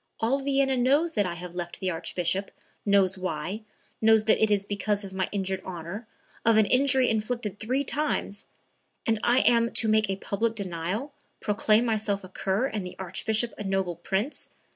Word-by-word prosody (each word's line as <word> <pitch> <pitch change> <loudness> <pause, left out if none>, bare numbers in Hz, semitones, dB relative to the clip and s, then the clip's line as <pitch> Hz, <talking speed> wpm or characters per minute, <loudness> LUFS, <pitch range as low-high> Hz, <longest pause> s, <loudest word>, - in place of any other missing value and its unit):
All 245 +5 +2
Vienna 270 -1 +1
knows 280 +7 +3
that 205 - +1
I 170 - -4
have 175 0 -8
left 175 -1 -5
the 185 -1 0
Archbishop, 175 +3 -1 0.4
knows 195 -2 +3
why, 185 +3 -3 0.4
knows 220 -1 +5
that 220 - +3
it 220 - +4
is 200 -1 +2
because 205 +1 -1
of 195 -1 -8
my 190 -1 -1
injured 190 -2 -2
honor, 185 +5 -6 0.4
of 230 -1 +4
an 220 - +6
injury 260 +2 +4
inflicted 220 -2 -1
three 255 +5 0
times, 280 -8 -2 0.6
and 225 -1 +1
I 245 +2 +4
am 235 -1 +4
to 225 - +3
make 215 -1 +3
a 195 - +1
public 220 +4 -1
denial, 195 - -3 0.3
proclaim 215 +2 +2
myself 215 -3 0
a 185 - -10
cur 195 +5 0
and 215 -7 -3
the 180 - -7
Archbishop 215 +5 -1
a - - -3
noble 190 -3 -1
prince? 195 - -2
210 Hz, 180 wpm, -27 LUFS, 190-230 Hz, 0.6 s, an